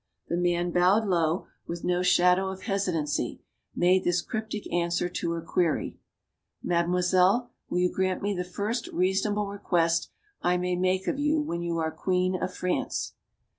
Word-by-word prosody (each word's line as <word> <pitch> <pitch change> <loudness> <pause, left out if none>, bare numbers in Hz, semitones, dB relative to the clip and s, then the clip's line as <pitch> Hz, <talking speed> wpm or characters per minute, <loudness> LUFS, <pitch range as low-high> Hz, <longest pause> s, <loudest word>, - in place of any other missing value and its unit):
The 170 - 0
man 175 0 +1
bowed 185 +5 +3
low, 170 -2 +1 0.2
with 170 0 -5
no 180 0 +1
shadow 180 +1 +4
of 190 0 -7
hesitancy, 180 -8 -1 0.3
made 185 +1 +3
this 175 -1 +1
cryptic 220 -2 -4
answer 175 0 +1
to 175 -1 -3
her 165 -1 -4
query: 165 -1 0 0.6
"Mademoiselle, 180 +6 +2 0.2
will - - -1
you 180 0 +2
grant 185 0 0
me 205 0 0
the 180 -2 -2
first 205 +6 -3
reason 190 +3 +1
able 210 0 0
request 175 -4 0 0.3
I 180 0 +2
may 180 0 -1
make 185 +1 +1
of 275 - -1
you 300 +2 +2
when 170 - -2
you 170 -1 -2
are 160 -1 -1
Queen 185 +1 0
of 185 - -2
France?" 180 0 -2
180 Hz, 165 wpm, -27 LUFS, 175-195 Hz, 0.6 s, shadow